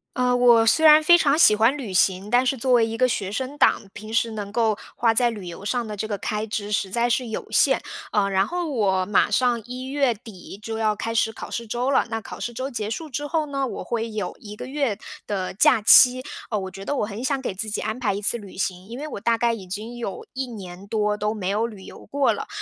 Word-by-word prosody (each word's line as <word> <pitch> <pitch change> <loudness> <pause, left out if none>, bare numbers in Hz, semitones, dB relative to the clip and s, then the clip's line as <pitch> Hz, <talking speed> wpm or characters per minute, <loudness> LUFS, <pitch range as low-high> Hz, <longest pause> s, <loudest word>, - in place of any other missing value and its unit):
呃， 250 0 +2
我 240 -2 +5
虽 315 +8 +4
然 310 0 +8
非 345 +3 +7
常 290 -2 +3
喜 215 -10 +6
欢 225 +7 +3
旅 235 -9 -6
行， 190 +2 +2
但 245 +1 +4
是 265 +1 +1
作 255 +2 -1
为 235 -2 +5
一 225 0 -4
个 255 - +3
学 205 -6 -2
生 260 +5 -4
党， - - +4
平 215 0 -9
时 230 0 +1
能 205 -2 -6
够 220 -1 +1 0.2
花 230 -1 +2
在 240 +2 +3
旅 210 -5 -7
游 175 +2 -8
上 240 +3 -1
的 210 - -5
这 215 +2 -4
个 205 -2 -3
开 210 +2 -3
支 210 -1 -4
实 200 -2 0
在 235 +5 +1
是 245 +1 0
有 220 - -5
限。 - - +4 0.3
呃， 205 -2 +2
然 195 +1 +2
后 355 0 -3
我 190 -7 +1
马 205 - +2
上 240 +1 +1
一 250 +1 -7
月 270 -1 +1
底 205 -4 -12
就 225 +1 -5
要 215 -1 +1
开 230 +2 -4
始 225 0 +1
考 225 - -9
试 235 -1 -4
周 245 +4 -1
了， 265 - +2
那 225 0 -2
考 - - -9
试 240 - -4
周 260 +4 -4
结 215 -4 -3
束 315 +8 -5
之 290 +3 -4
后 315 0 0
呢， 275 -2 -2
我 - - -6
会 230 -1 -3
有 210 -4 -4
1 210 -1 -10
个 210 - -7
月 265 -5 -1 0.3
的 190 -3 -3
假 200 - +4
期， 250 +4 +7 0.3
哦， 215 - -1
我 190 -1 -6
觉 195 - -9
得 285 - -2
我 215 - 0
很 210 +3 -7
想 275 +1 0
给 260 -6 -4
自 215 +4 -4
己 210 - -2
安 220 +3 -3
排 235 -5 0
一 200 - -4
次 210 - +2
旅 200 -4 -12
行。 185 -1 -3
因 235 +3 -8
为 300 +3 -5
我 295 - -6
大 230 +3 +1
概 235 0 +1
已 200 -5 -8
经 215 +6 -6
有 230 -5 -5
1 265 0 -3
年 195 -4 -9
多 210 0 0
都 210 +1 -1
没 190 -4 -4
有 210 +4 0
旅 210 -5 -11
游 - - -12
过 280 0 +2
了， - - -6
225 Hz, 280 characters per minute, -23 LUFS, 205-250 Hz, 0.3 s, 然